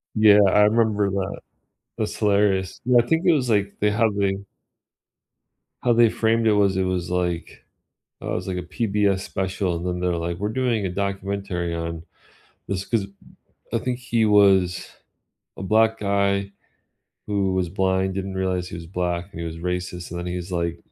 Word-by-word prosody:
Yeah, 105 -1 +7
I 105 +2 +4
remember 105 -2 +2
that. 95 0 -3 0.6
That's - - -2
hilarious. 100 -2 +1
Yeah, 125 -1 +5
I - - -13
think 165 +5 +1
it 175 - +6
was 130 -5 0
like 100 -2 +1
they 105 - +3
how 110 +2 +2
they 100 -1 0 1.5
how 120 - +3
they 115 0 +5
framed 115 +1 +1
it 110 - +5
was 100 -2 +2
it 95 - +2
was 90 -2 -2
like, 90 -1 -3 0.6
uh, - - -4
it - - -1
was - - -4
like 95 - -2
a 90 - -3
PBS 100 +1 0
special 95 -2 -2
and 85 +2 -5
then 90 0 -2
they're 90 -1 0
like, 85 +1 -3
"We're 105 - -1
doing 115 -4 0
a - - -2
documentary 100 -2 -3
on 85 -1 -4 0.7
this 95 0 -2
'cause" 110 -3 0
m 100 0 -13 0.6
I - - +2
think 125 -1 -3
he 120 -3 +1
was 95 -3 +4 0.7
a - - -7
black 110 +3 +3
guy 100 -1 0 0.7
who 100 -2 0
was 90 -2 0
blind, 95 +1 0
didn't 95 0 -4
realize 95 -1 -1
he - - -7
was 85 -1 -9
black, 90 0 -2
and 80 - -7
he 85 - -3
was 80 0 -6
racist, 90 0 -4
and 85 - -5
then 90 - -5
he 90 0 -3
was 90 +1 -6
like 85 -1 -1
95 Hz, 190 wpm, -23 LUFS, 90-105 Hz, 1.5 s, Yeah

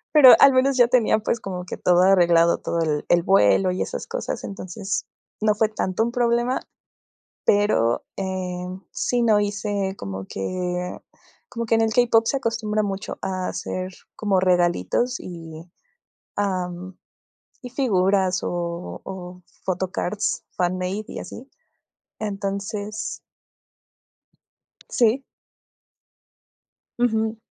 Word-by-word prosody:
Pero 270 -4 +10
al 275 - +8
menos 260 +1 +3
yo 245 -1 +6
tenía, 235 -3 +3
pues, 220 +1 -2
como 180 -2 -5
que - - -5
todo 180 -1 +3
arreglado, 170 -3 +5
todo 170 - -2
el 155 -3 0
el 175 - +5
vuelo 185 - +4
y 185 - -3
esas - - -4
cosas, - - -4
entonces 195 +1 -4 0.4
no 210 -1 +3
fue 220 +1 +3
tanto 215 -1 -1
un 235 - -1
problema 240 +1 +1 0.9
pero, 205 - +3
eh, 185 -2 -3 0.3
sí 245 -1 0
no 220 -3 +4
hice 205 -1 -2
como 95 -1 -6
que 180 - -3 0.5
como 235 -1 -4
que 225 - +2
en 225 - +3
el 220 0 +1
k-pop 235 -2 +4
se 275 - +1
acostumbra 220 -3 -1
mucho 195 0 -4
a 185 -1 -2
hacer 185 0 -4 0.2
como 205 -3 +1
regalitos 180 - +1
y, 165 -1 -9 0.7
am, 185 -2 -3 0.7
y 250 - -7
figuras 195 -7 +2
o 170 0 -4
o 180 -1 -8 0.2
photocards, 185 +2 -2
fanmade 185 +3 -1
y - - -6
así. 270 +3 -10 0.7
Entonces 205 +1 -4 1.7
Sí. 245 +2 +2 1.8
Ujú. 220 -2 +1
195 Hz, 120 wpm, -23 LUFS, 180-225 Hz, 1.8 s, Pero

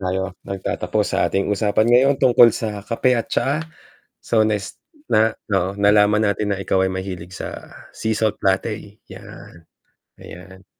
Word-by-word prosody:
Tayo 95 0 -3
nagtatapos 95 -1 -2
sa - - 0
ating 95 0 -1
usapan 105 +2 +1
ngayon 135 +3 +4
tungkol 120 -2 +6
sa 105 -3 -5
kape 125 +3 +1
at 115 - -4
tsaa, 140 +6 0 0.6
so 110 -2 +2
next 105 -2 -3 0.3
na 110 0 +3 0.2
oo, 95 -1 0
nalaman 105 +1 +3
natin 100 0 -1
na 95 - -5
ikaw 95 -1 +1
ay - - 0
mahilig 95 -2 -6
sa - - -8 0.2
sea 110 0 -3
salt 110 0 -1
latte, 100 +2 -2
yan. 85 - -13 0.6
Ayan. 95 +2 -13
105 Hz, 150 wpm, -20 LUFS, 95-110 Hz, 0.6 s, tungkol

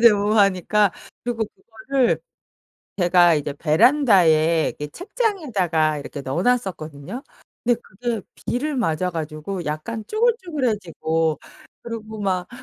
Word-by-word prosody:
좋아하니까. 205 -2 +4 0.3
그리고 235 -2 -1
그거를 235 +5 -1 0.8
제가 175 -2 +5
이제 145 -1 -2
베란다에 165 - +4
이렇게 150 - -5
책장에다가 210 - 0
이렇게 140 0 -7
넣어 135 +6 -2
놨었거든요. 190 - -2 0.4
근데 240 -1 +2
그게 235 +2 -4 0.3
비를 290 +4 -1
맞아 180 -6 0
가지고 160 +3 -5
약간 185 +10 -4
쭈글쭈글해지고 235 - 0 0.4
그리고 220 -2 -7
막 185 -3 -1
200 Hz, 290 characters per minute, -22 LUFS, 160-240 Hz, 0.8 s, 제가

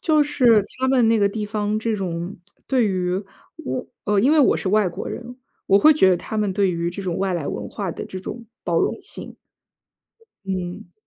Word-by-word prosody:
就 310 -2 +3
是 245 -7 +4 0.2
他 260 - +1
们 255 -4 +4
那 225 -1 +4
个 200 -1 +3
地 210 +1 -4
方 210 0 -1
这 220 0 -1
种 175 -1 -4 0.3
对 255 -5 +2
于， 185 0 -1 0.8
呃， 205 -1 +2
因 260 +8 +4
为 315 - +4
我 270 - +4
是 190 - -3
外 210 -1 +3
国 170 - -6
人， 245 +1 -7 0.3
我 195 - +5
会 310 +5 +7
觉 190 -11 +5
得 180 - +4
他 220 - -6
们 210 -2 0
对 195 -1 +2
于 170 0 -2
这 195 +3 -6
种 180 -3 -2
外 195 -1 0
来 165 -5 -2
文 - - -4
化 200 -4 -4
的 - - -6
这 185 - -7
种 235 +5 -7 0.2
包 - - +1
容 - - 0
性。 - - -7 1.1
嗯。 180 -2 -5
205 Hz, 220 characters per minute, -22 LUFS, 185-230 Hz, 1.1 s, 会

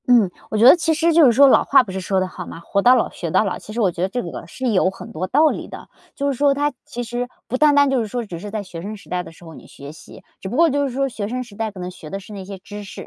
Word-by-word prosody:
嗯， 235 -6 +5 0.2
我 215 - -2
觉 220 - +4
得 265 - +10
其 325 -1 0
实 335 +1 +2
就 325 -1 +6
是 250 - +6
说 275 +5 +6
老 - - +5
话 275 - +5
不 205 - -9
是 190 0 -4
说 190 +1 0
得 185 - -1
好 180 -1 -9
吗？ - - -9
活 200 +4 -1
到 250 +5 +6
老 - - +1
学 170 - -5
到 215 - +2
老， 195 - -3
其 - - -11
实 230 - -4
我 200 -5 +2
觉 170 - -7
得 185 - 0
这 245 +4 -3
个 - - -8
是 260 - -4
有 185 -3 +3
很 190 - -10
多 180 +4 -4
道 305 +9 +4
理 - - -5
的。 - - -11 0.3
就 280 - -3
是 - - -2
说 285 0 +3
它 290 +1 0
其 245 - -5
实 240 +1 -4 0.2
不 255 - -3
单 295 +2 +4
单 285 0 +5
就 270 -2 +1
是 220 - -3
说 240 +2 -4
只 175 -5 -8
是 205 +4 -7
在 210 0 -4
学 180 -3 -9
生 210 +4 -6
时 200 - -18
代 180 0 -1
的 180 - -11
时 170 +1 -17
候 165 - -11
你 - - -14
学 140 +1 -11
习， 150 -2 -14 0.2
只 190 - -6
不 240 - -5
过 335 0 +5
就 285 0 0
是 - - -5
说 275 +1 0
学 215 -5 -5
生 255 +3 -3
时 230 -5 -15
代 220 +1 -2
可 200 -3 -12
能 180 0 -5
学 160 -4 -12
的 195 - -5
是 205 +2 -12
那 195 -2 -7
些 195 +1 -8
知 205 +2 -9
识， 225 +5 -9
215 Hz, 370 characters per minute, -20 LUFS, 185-260 Hz, 0.3 s, 得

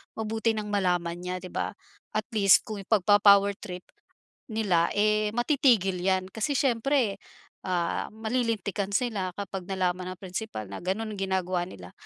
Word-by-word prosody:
Mabuti 220 +1 -1
nang 210 -1 -4
malaman 180 -4 0
niya 180 +1 -4
di 185 - -7
ba - - -2 0.4
at 215 -1 0
least 200 -2 +6
kung 215 -2 -5
ipagpa-power 200 0 +5
trip 180 -3 -7 0.6
nila, 200 -7 +2
eh, 215 0 +2
matitigil 240 - +3
'yan 185 0 0
kasi 225 +6 -1
siyempre, 255 -4 +1 0.5
ah, 175 -2 -1
malilintikan 220 -3 -2
sila 200 -8 -1
kapag 195 -2 -5
nalaman 185 -1 -1
ng - - -36
principal 185 - -5
na 100 - -6
ganoon 210 +4 -3
ginagawa 185 -2 -1
nila. 90 - -11
200 Hz, 140 wpm, -27 LUFS, 185-220 Hz, 0.6 s, least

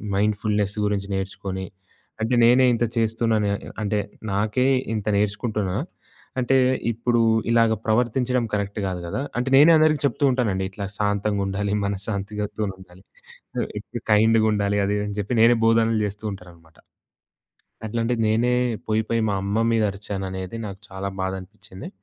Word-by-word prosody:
Mind 105 +2 +2
fullness 105 -2 0
గురించి 100 -1 -1
నేర్చుకొని, 95 0 -4 0.6
అంటే 110 +3 0
నేనే 125 +2 +6
ఇంత 115 - 0
చేస్తున్నాను. 115 -1 +1 0.3
అంటే 105 0 0 0.3
నాకే 105 +6 +1 0.3
ఇంత 105 -1 -3
నేర్చుకుంటున్నా, 105 -2 -1 0.6
అంటే 130 +1 +2 0.4
ఇప్పుడు 120 +1 0 0.3
ఇలాగ 115 -1 +4
ప్రవర్తించడం 125 +2 +1
కరెక్ట్ 100 0 -2
కాదు 90 -1 -3
గదా! 125 - -3 0.2
అంటే 125 +2 0
నేనే 150 +4 +8
అందరికి 155 -2 +3
చెప్తూ 140 +2 -1
ఉంటానండి. 110 -7 0
ఇట్లా 100 +1 -5
శాంతంగుండాలి 100 -1 -1
మనశాంతిగా 100 +1 -3
ఇంట్లొనుండాలి. 95 -3 -6 0.6
ఆ! - - +2 0.2
ఇప్పుడు 115 +2 -8
కైండ్‌గుండాలి 105 -2 +3
అది 100 - 0
ఇదని 105 0 -3
జెప్పి 105 +5 -2
నేనే 120 +1 +6
బోధనలు 115 0 +3
జేస్తూ 105 +2 -5
ఉంటాననమాట. 85 -4 -14 1.1
అట్లాంటి 115 +2 -1
నేనే 115 +3 +2 0.3
పోయిపోయి 110 +1 0
మా - - 0
అమ్మ 100 +2 -1 0.2
మీద 115 -1 +2
అరిచాననేది 95 0 -5
నాకు 100 -1 -7
చాలా 95 +1 -5
బాధనిపిచింది. 95 +1 -6
105 Hz, 130 wpm, -23 LUFS, 100-115 Hz, 1.1 s, నేనే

